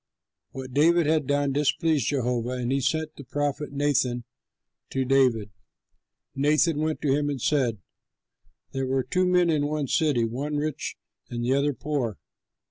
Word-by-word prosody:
What 130 Hz, -1 st, -8 dB
David 165 Hz, +4 st, +4 dB
had 155 Hz, -2 st, +1 dB
done 145 Hz, -1 st, +1 dB
displeased 150 Hz, +1 st, +1 dB
Jehovah 125 Hz, -2 st, -1 dB
and 120 Hz, 0 st, -1 dB
he 135 Hz, 0 st, +1 dB
sent 155 Hz, +3 st, -1 dB
the 140 Hz, -, -8 dB
prophet 145 Hz, +2 st, -2 dB
Nathan 140 Hz, -4 st, +1 dB, 0.7 s
to 135 Hz, -1 st, -1 dB
David. 125 Hz, -6 st, +2 dB, 0.8 s
Nathan 150 Hz, +3 st, +2 dB
went 155 Hz, 0 st, -1 dB
to 140 Hz, -2 st, +3 dB
him 145 Hz, 0 st, 0 dB
and 140 Hz, -2 st, -3 dB
said, 125 Hz, -4 st, +1 dB, 0.9 s
"There 135 Hz, -1 st, -2 dB
were 130 Hz, 0 st, +1 dB
two 185 Hz, +6 st, +1 dB
men 180 Hz, -2 st, +3 dB
in 145 Hz, -2 st, +1 dB
one 150 Hz, -1 st, -1 dB
city, 145 Hz, -3 st, +2 dB
the 115 Hz, -, 0 dB
one 140 Hz, +6 st, -3 dB
rich 150 Hz, 0 st, -3 dB, 0.3 s
and 120 Hz, 0 st, -3 dB
the 130 Hz, -, +2 dB
other 140 Hz, 0 st, +1 dB
poor. 130 Hz, -5 st, -2 dB
140 Hz, 160 wpm, -26 LUFS, 130-150 Hz, 0.9 s, David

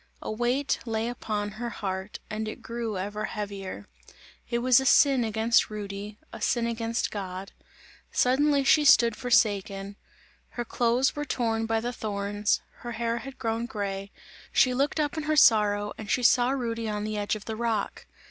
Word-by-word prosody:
A -, -, -5 dB
weight 245 Hz, +5 st, 0 dB
lay 225 Hz, 0 st, -1 dB
upon 210 Hz, -4 st, -3 dB
her 235 Hz, +3 st, -5 dB
heart 190 Hz, -2 st, -4 dB
and 215 Hz, 0 st, -4 dB
it 215 Hz, -, -7 dB
grew 230 Hz, -3 st, -4 dB
ever 205 Hz, +3 st, -3 dB
heavier. 200 Hz, -, -6 dB, 0.6 s
It 235 Hz, -, 0 dB
was 250 Hz, +1 st, +5 dB
a 265 Hz, -, -2 dB
sin 275 Hz, -3 st, +5 dB
against 225 Hz, +1 st, +2 dB
Rudy, 205 Hz, 0 st, -6 dB, 0.2 s
a -, -, -8 dB
sin 235 Hz, -1 st, +1 dB
against 230 Hz, 0 st, -1 dB
God; 190 Hz, -1 st, -6 dB, 0.6 s
suddenly 280 Hz, +3 st, +3 dB
she 300 Hz, +2 st, +5 dB
stood 235 Hz, -5 st, +6 dB
forsaken. 200 Hz, -4 st, +1 dB, 0.5 s
Her 240 Hz, -, -5 dB
clothes 240 Hz, +3 st, +1 dB
were 295 Hz, -, -2 dB
torn 225 Hz, -5 st, -1 dB
by 225 Hz, 0 st, +1 dB
the 240 Hz, +2 st, -3 dB
thorns; 205 Hz, -1 st, -1 dB, 0.2 s
her 240 Hz, -1 st, -7 dB
hair 230 Hz, +1 st, -1 dB
had 270 Hz, +2 st, -9 dB
grown 230 Hz, -1 st, -2 dB
grey; 200 Hz, -4 st, -4 dB, 0.4 s
she 255 Hz, -, +4 dB
looked 280 Hz, +4 st, 0 dB
up 300 Hz, +1 st, -1 dB
in 310 Hz, -, -3 dB
her 310 Hz, 0 st, +1 dB
sorrow 210 Hz, -6 st, +4 dB
and 215 Hz, -2 st, -7 dB
she 250 Hz, -, +1 dB
saw 245 Hz, +1 st, +5 dB
Rudy 230 Hz, -4 st, -2 dB
on 210 Hz, -1 st, -2 dB
the 215 Hz, 0 st, -3 dB
edge 205 Hz, +1 st, 0 dB
of 215 Hz, -, -9 dB
the 220 Hz, -, -4 dB
rock. 225 Hz, -3 st, -2 dB
225 Hz, 175 wpm, -27 LUFS, 205-245 Hz, 0.6 s, stood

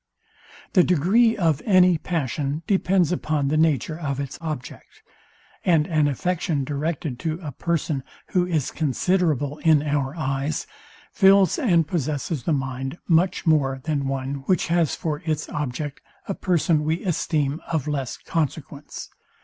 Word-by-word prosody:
The 185 Hz, -, +6 dB
degree 200 Hz, +8 st, +3 dB
of 160 Hz, -6 st, +1 dB
any 185 Hz, -4 st, +5 dB
passion 150 Hz, -1 st, -2 dB
depends 185 Hz, -3 st, +2 dB
upon 155 Hz, -5 st, 0 dB
the 155 Hz, -, +1 dB
nature 155 Hz, 0 st, +1 dB
of 140 Hz, -4 st, -3 dB
its 140 Hz, -2 st, -5 dB
object; 155 Hz, -6 st, -7 dB, 0.6 s
and 165 Hz, -4 st, +3 dB
an 155 Hz, -3 st, +2 dB
affection 160 Hz, +1 st, -1 dB
directed 145 Hz, -1 st, -3 dB
to 160 Hz, +2 st, -2 dB
a 150 Hz, -, -4 dB
person, 155 Hz, -2 st, -2 dB, 0.3 s
who 180 Hz, -1 st, +1 dB
is 160 Hz, -6 st, -1 dB
considerable 155 Hz, -1 st, 0 dB
in 155 Hz, -2 st, +4 dB
our 145 Hz, -1 st, -1 dB
eyes, 140 Hz, -1 st, -2 dB, 0.5 s
fills 195 Hz, -3 st, +5 dB
and 170 Hz, -, +3 dB
possesses 155 Hz, -2 st, -2 dB
the -, -, +1 dB
mind 135 Hz, +1 st, -2 dB
much 180 Hz, +3 st, +2 dB
more 140 Hz, -5 st, +2 dB
than 145 Hz, -3 st, -1 dB
one, 135 Hz, +1 st, -2 dB
which 185 Hz, -2 st, +1 dB
has 170 Hz, -3 st, +2 dB
for 150 Hz, -2 st, -3 dB
its 155 Hz, -2 st, -2 dB
object 145 Hz, 0 st, -4 dB, 0.3 s
a 195 Hz, -, -1 dB
person 170 Hz, -5 st, +1 dB
we 160 Hz, +2 st, -1 dB
esteem 155 Hz, -4 st, -1 dB
of 155 Hz, -4 st, -1 dB
less 140 Hz, -4 st, -2 dB
consequence. 150 Hz, -2 st, -4 dB
155 Hz, 140 wpm, -24 LUFS, 140-170 Hz, 0.6 s, The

